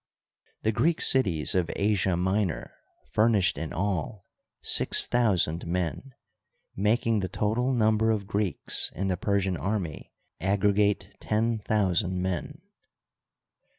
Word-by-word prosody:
The 110 - +2
Greek 160 +9 +1
cities 90 - +2
of 90 -3 +1
Asia 100 -3 +1
Minor 95 0 -1 0.4
furnished 105 -3 +3
in 80 - -5
all 95 +1 -3 0.4
six - - +3
thousand 95 -9 +1
men, 90 - -3 0.6
making 110 +2 +1
the 95 -2 -3
total 110 +7 0
number 110 -2 +2
of 105 -3 0
Greeks 100 -2 -1
in 95 +1 -2
the 90 - +1
Persian 95 -1 0
army 90 -1 -3 0.3
aggregate 100 +1 +1
ten 110 +1 0
thousand 95 -3 0
men. 90 -2 -4
100 Hz, 115 wpm, -27 LUFS, 90-110 Hz, 0.6 s, furnished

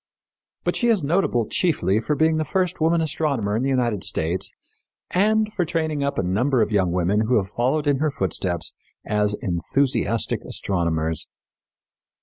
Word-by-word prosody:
But - - 0
she 240 - +1
is 220 -8 +3
notable 140 - +1
chiefly 140 - +1
for 150 +7 -1
being 160 +2 +2
the 155 - +1
first 180 0 -1
woman 165 +1 +3
astronomer 140 -9 0
in 115 - 0
the 135 - 0
United 120 -7 0
States 85 +3 -1 0.6
and 215 +3 +2
for 180 - 0
training 160 -3 -1
up 140 - -1
a - - +1
number 120 +8 +2
of - - -3
young 95 -4 +2
women 95 +5 +1
who 125 0 +3
have 95 -2 -1
followed 130 +8 0
in 145 -2 +2
her 155 +3 +1
footsteps 95 - -2 0.3
as 105 0 +1
enthusiastic 115 - 0
astronomers. 80 -4 -1
125 Hz, 160 wpm, -23 LUFS, 100-155 Hz, 0.6 s, is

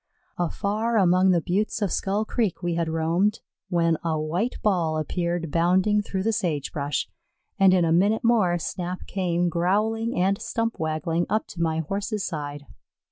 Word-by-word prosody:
Afar 210 +6 0
among 185 -1 +4
the 175 -2 +3
buttes 205 +4 -1
of 200 -5 -1
Skull 205 +3 0
Creek 215 -6 -1
we 175 -1 0
had 165 -1 -1
roamed 165 +6 +1 0.3
when 170 -2 +2
a 160 -2 0
white 175 +10 -1
ball 170 -6 +1
appeared 170 +1 -2
bounding 185 +6 +3
through 190 -2 -3
the 225 +2 +1
sage 170 -10 -1
brush, 145 -1 -2 0.5
and 195 -1 +6
in 180 -2 +4
a 165 - +1
minute 200 +6 +3
more 215 -7 +3
Snap 180 +2 -4
came, 175 -2 0
growling 215 +7 0
and 195 +2 +1
stump 230 0 -2
waggling, 160 +2 -1
up 215 - 0
to 170 - -6
my 160 -1 +1
Horse's 200 +5 -3
side. 145 -3 -5
180 Hz, 165 wpm, -25 LUFS, 165-205 Hz, 0.5 s, and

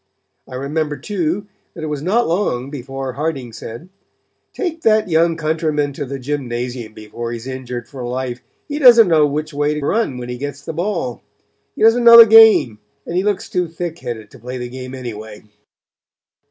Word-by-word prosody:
I 130 - -8
remember 150 +3 -2
too 195 -1 -2 0.3
that 165 - -7
it - - -2
was 150 -2 -4
not 215 +9 +1
long 140 -8 -1
before 135 -1 -6
Harding 140 -5 -4
said: 115 +9 -9 0.6
'Take 335 -5 -4
that 215 -3 +2
young 165 +1 +3
countryman 155 -2 -1
to 145 +1 -5
the 135 +1 -5
gymnasium 125 -4 -4
before 115 +2 -7
he 120 - -4
is 115 - -11
injured 125 -2 -6
for 135 -3 -8
life; 125 0 -4 0.3
he 295 0 -4
doesn't 235 -6 +8
know 155 -3 +4
which 150 +2 -4
way 145 +1 0
to 150 -2 -4
run 210 - 0
when 125 -1 -6
he 125 0 -6
gets 145 +1 -6
the - - -5
ball; 170 - -3 0.5
he - - -2
doesn't 225 +2 +5
know 235 0 +10
the 230 - +12
game; 220 - +6 0.3
and 170 - -5
he 180 - +2
looks 205 -1 -1
too 180 -5 -1
thick 165 0 -6
headed 110 -3 -7
to - - -15
play 125 +3 -6
the 125 -1 -6
game 130 +1 -8
anyway.' 110 -4 -8
145 Hz, 190 wpm, -18 LUFS, 125-175 Hz, 0.6 s, the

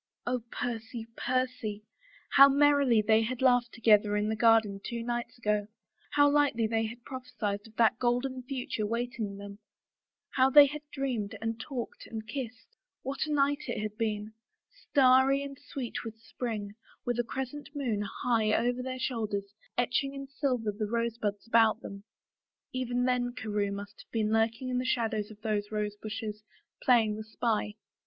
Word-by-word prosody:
Oh, 245 0 0
Percy, 230 -1 -4
Percy 255 -5 -1
I - - -42 0.5
How 275 +1 +10
merrily 280 -5 +4
they 220 +1 +4
had 235 +2 -2
laughed 245 -2 +3
together 210 -2 +4
in 210 +1 0
the 220 - 0
garden 220 -3 +4
two 235 -1 -4
nights 240 +1 -3
ago, 210 -3 0 0.5
how 290 0 +6
lightly 285 -6 +3
they 225 0 0
had 235 +2 -10
prophesied 225 -6 -4
of 220 - -19
that 225 0 +3
golden 250 +2 0
future 250 -5 -3
waiting 230 -3 -3
them, 200 0 -9 0.7
how 260 0 +4
they 290 +2 +9
had 295 +2 -4
dreamed 250 -8 -2
and 225 0 -3
talked 250 -1 -6
and 220 -1 -6
kissed! 250 - -6 0.3
What 275 +3 -2
a - - -3
night 285 0 +2
it 240 - -2
had 210 0 -4
been 215 -1 -2 0.3
— - - -28
starry 270 0 +5
and 275 -1 -8
sweet 255 -4 -5
with 225 -1 -7
spring, 220 -3 -5 0.3
with 245 -1 -1
a - - +3
crescent 265 +4 -5
moon, 240 -8 -1 0.2
high 220 -3 +2
over 245 +2 +1
their 255 0 -4
shoulders, 210 -6 -2 0.2
etching 250 +3 +1
in 275 0 -5
silver 265 -5 -1
the 210 +1 -3
rosebuds 230 -2 -2
about 230 -1 +4
them.... 200 +1 -8 0.7
Even 245 -1 -1
then 245 -1 +1
Carewe 210 -4 -1
must 200 +1 -7
have - - -22
been 220 -1 0
lurking 225 +3 +1
in 250 0 0
the - - -1
shadow 230 -4 0
of 210 0 -7
those 210 -2 -1
rosebushes, 210 0 -4 0.4
playing 225 -4 +4
the 220 - -5
spy. 220 -1 -1
230 Hz, 165 wpm, -30 LUFS, 215-255 Hz, 0.7 s, How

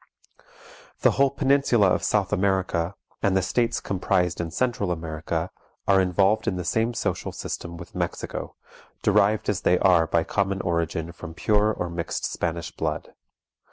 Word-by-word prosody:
The - - +5
whole 140 0 +3
peninsula 135 -7 +3
of - - +1
South 105 -2 +1
America, 95 -2 0 0.3
and 95 -1 +2
the 95 - +1
states 120 +5 +1
comprised 90 -2 0
in 85 - -3
Central 120 -2 -1
America, 80 +1 -3 0.4
are 95 -1 +5
involved 95 +3 +2
in - - +1
the 90 -1 -4
same 115 +5 0
social - - -2
system 85 -1 -6
with - - -11
Mexico, - - -4 0.5
derived 105 +2 +3
as 105 - 0
they 90 - +3
are 90 -4 +4
by 85 0 +2
common 95 +2 -1
origin 85 -1 -1
from 80 -1 -9
pure 105 +2 +2
or 90 - -3
mixed 85 -1 -3
Spanish 85 -1 -3
blood. 75 -1 -3
95 Hz, 155 wpm, -25 LUFS, 85-105 Hz, 0.5 s, The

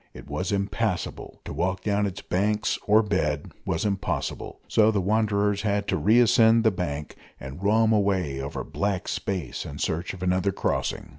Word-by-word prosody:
It - - -11
was 75 +7 -3
impassable; 100 0 -2
to - - -6
walk 95 +1 -1
down 105 -1 +1
its 100 +1 -7
banks 105 +3 0
or 110 +2 +5
bed 75 -8 -1 0.2
was 80 - -1
impossible, 100 -2 -3
so 110 -1 +4
the 105 -2 +1
wanderers 105 0 +1
had 100 -1 0
to - - +2
re 110 +4 +4
ascend 115 -1 +5
the 110 - +4
bank, 75 -5 -4 0.2
and 65 +7 -8
roam 110 +2 +3
away 95 -10 +1
over 70 +2 -4
black 100 -2 -2
space 95 -4 -3
in 70 - -8
search 85 +5 -2
of 90 - -8
another 90 +2 +1
crossing. - - -2
100 Hz, 170 wpm, -25 LUFS, 90-105 Hz, 0.2 s, or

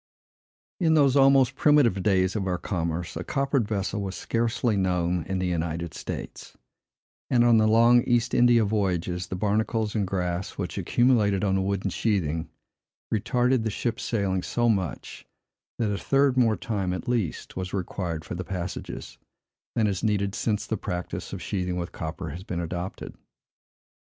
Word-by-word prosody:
In 160 -3 +3
those 140 -3 +4
almost 135 -2 +5
primitive 140 -9 +4
days 95 0 +2
of 100 -3 -1
our 90 -1 0
commerce, 85 -2 -3
a - - -4
coppered 135 -4 0
vessel 100 -1 -2
was 95 -1 -4
scarcely 115 -1 0
known 90 -2 +1
in 95 +2 -2
the 90 - -1
United 85 -2 -2
States; - - -7 0.7
and 120 -2 +4
on 120 -1 +5
the 110 0 +4
long 115 +2 +6
East 120 0 +1
India 120 -2 +5
voyages, 90 -4 -1
the 95 - -4
barnacles 105 +2 0
and 105 -4 0
grass, 90 0 -3
which - - -3
accumulated 110 -6 +2
on 100 -2 +2
the 95 - +2
wooden 95 0 -1
sheathing, 80 -7 -1 0.6
retarded 125 +4 +2
the 110 - 0
ship's 115 +3 -2
sailing 100 -5 0
so 120 +6 0
much, 95 -6 -2 0.5
that 110 -3 0
a 100 - -3
third 135 -1 +2
more 115 -4 +3
time, 100 -5 -2
at 90 - -5
least, 115 -9 -2
was 95 0 -4
required 85 -4 -3
for - - -6
the 90 +1 -4
passages, 90 -1 -6 0.6
than 110 - +2
is 100 -3 -1
needed 100 -2 +1
since 105 -1 -1
the 110 - -2
practice 90 -1 -5
of - - -6
sheathing 90 -3 -2
with 85 -1 -4
copper 80 +1 -5
has 85 +5 -7
been 90 -3 -4
adopted. 85 +2 -5
100 Hz, 165 wpm, -26 LUFS, 90-115 Hz, 0.7 s, long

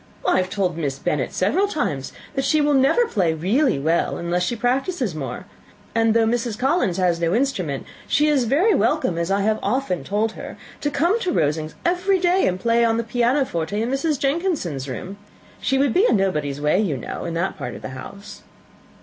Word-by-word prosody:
I - - +4
have 185 0 0
told 185 -4 -1
Miss 140 -4 -2
Bennet 140 -2 -1
several 340 - +1
times, 150 - -2 0.2
that 270 -2 -1
she 310 +3 +2
will 295 0 +3
never 275 - +4
play 180 - 0
really 205 - +2
well, 160 +5 0
unless 170 +1 -1
she 180 +7 0
practises 250 - -1
more; 155 +4 -5 0.5
and 225 -1 +2
though 230 -1 +4
Mrs. 230 -1 -1
Collins 265 - +1
has 180 -3 +1
no 170 +2 +1
instrument, 190 - -1 0.2
she 300 +1 +3
is 285 -5 +2
very 320 - +3
welcome, 175 - +1
as 170 +1 -1
I 200 +1 +1
have 215 +1 +1
often 210 -4 -1
told 215 +2 0
her, - - -9 0.2
to 290 - -1
come 340 +10 +1
to 370 -6 -1
Rosings 155 - 0
every 365 +3 +2
day, 360 +1 +3
and 185 0 -1
play 235 +2 +2
on 225 -1 +2
the 230 - 0
pianoforte 235 - 0
in 230 +3 -1
Mrs. 290 +2 0
Jenkinson's 275 - -1
room. 185 +10 -6 0.4
She 270 +1 +1
would 270 -3 +2
be 415 +6 +4
in - - +4
nobody's 150 -8 0
way, 150 +5 +2
you 180 -10 0
know, 120 - -6
in 170 -1 -4
that 170 +3 -1
part 125 - -6
of - - -11
the - - -5
house." 200 +10 -10
220 Hz, 200 wpm, -22 LUFS, 170-275 Hz, 0.5 s, I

